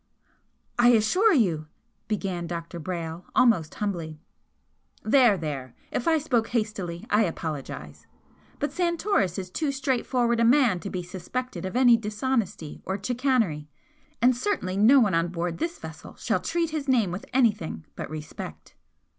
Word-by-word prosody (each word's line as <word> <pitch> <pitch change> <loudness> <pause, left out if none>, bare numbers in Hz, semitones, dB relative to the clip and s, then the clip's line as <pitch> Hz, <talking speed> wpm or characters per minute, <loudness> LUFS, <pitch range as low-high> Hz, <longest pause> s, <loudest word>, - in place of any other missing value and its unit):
"I 240 - +6
assure 360 - +4
you 175 - +2 0.2
" - - -46
began 190 -5 -2
Dr. 170 0 -5
Brayle, 170 0 -5
almost 225 -11 +3
humbly. 170 -7 -3 0.8
"There, 230 -2 +5
there! 140 -6 -5 0.2
If 245 - -2
I 325 -1 +5
spoke 250 -7 +1
hastily, 210 -7 -3
I 210 - +5
apologise. 160 -5 -6 0.5
But 290 - -2
Santoris 340 - 0
is 185 -2 -5
too 300 - -1
straightforward 250 -3 0
a - - +4
man 240 -6 +4
to 200 - -6
be 180 -2 -4
suspected 190 +6 -5
of 185 - -7
any 245 -2 +6
dishonesty 215 - -2
or 190 - -2
chicanery 230 - 0 0.5
and 250 0 +5
certainly 240 - -1
no 225 +8 +6
one 210 -7 +3
on 165 +1 +2
board 170 0 -3
this 335 +2 -2
vessel - - -10
shall - - 0
treat 335 -1 -1
his 305 -3 -3
name 235 -8 +3
with 180 +3 -6
anything 210 - +1
but - - -6
respect." 155 0 -8
210 Hz, 150 wpm, -26 LUFS, 175-255 Hz, 0.8 s, I